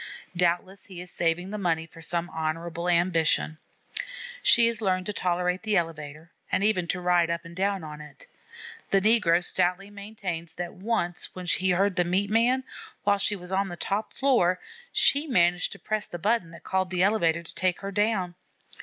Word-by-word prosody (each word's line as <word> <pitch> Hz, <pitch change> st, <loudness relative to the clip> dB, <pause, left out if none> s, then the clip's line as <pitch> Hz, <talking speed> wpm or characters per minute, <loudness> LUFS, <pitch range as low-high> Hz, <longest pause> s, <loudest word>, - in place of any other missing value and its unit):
Doubtless 180 Hz, +2 st, 0 dB
he 185 Hz, -3 st, -9 dB
is 180 Hz, 0 st, -8 dB
saving 175 Hz, +3 st, -1 dB
the 210 Hz, -, -4 dB
money 165 Hz, -4 st, 0 dB
for 165 Hz, +1 st, -15 dB
some 170 Hz, +1 st, -1 dB
honorable 165 Hz, +2 st, -3 dB
ambition. 170 Hz, -2 st, +2 dB, 0.8 s
She 235 Hz, -, +6 dB
has 230 Hz, -1 st, 0 dB
learned 185 Hz, -3 st, 0 dB
to 210 Hz, -, -3 dB
tolerate 180 Hz, 0 st, 0 dB
the 215 Hz, -2 st, +1 dB
elevator, 160 Hz, -1 st, -4 dB, 0.2 s
and 190 Hz, -, +1 dB
even 195 Hz, -5 st, +2 dB
to 180 Hz, -, -1 dB
ride 175 Hz, -1 st, +2 dB
up 170 Hz, 0 st, -3 dB
and 170 Hz, 0 st, -11 dB
down 195 Hz, -1 st, 0 dB
on 150 Hz, -1 st, -8 dB
it. 150 Hz, -2 st, -11 dB, 0.6 s
The 195 Hz, -, +4 dB
negro 195 Hz, -5 st, +4 dB
stoutly 180 Hz, +3 st, 0 dB
maintains 195 Hz, -5 st, -6 dB
that 175 Hz, 0 st, -5 dB
once, 185 Hz, -4 st, -2 dB
when 185 Hz, -1 st, -6 dB
she 185 Hz, +2 st, +1 dB
heard 190 Hz, +1 st, +2 dB
the 180 Hz, -, +4 dB
meat 190 Hz, +4 st, 0 dB
man, 245 Hz, +4 st, +3 dB, 0.4 s
while 205 Hz, -1 st, +3 dB
she 205 Hz, +2 st, 0 dB
was 180 Hz, -1 st, -9 dB
on 195 Hz, +1 st, +1 dB
the 175 Hz, -2 st, -7 dB
top 205 Hz, +5 st, -2 dB
floor, 240 Hz, -10 st, +2 dB, 0.3 s
she 285 Hz, +3 st, +4 dB
managed 175 Hz, -, +2 dB
to -, -, -11 dB
press 215 Hz, -1 st, -3 dB
the 175 Hz, -, -6 dB
button 205 Hz, 0 st, 0 dB
that 170 Hz, -, -13 dB
called 190 Hz, -1 st, 0 dB
the 180 Hz, 0 st, +1 dB
elevator 170 Hz, -5 st, +2 dB
to 160 Hz, -, -12 dB
take 185 Hz, -1 st, 0 dB
her 195 Hz, 0 st, -4 dB
down. 205 Hz, -3 st, 0 dB
180 Hz, 190 wpm, -27 LUFS, 170-200 Hz, 0.8 s, She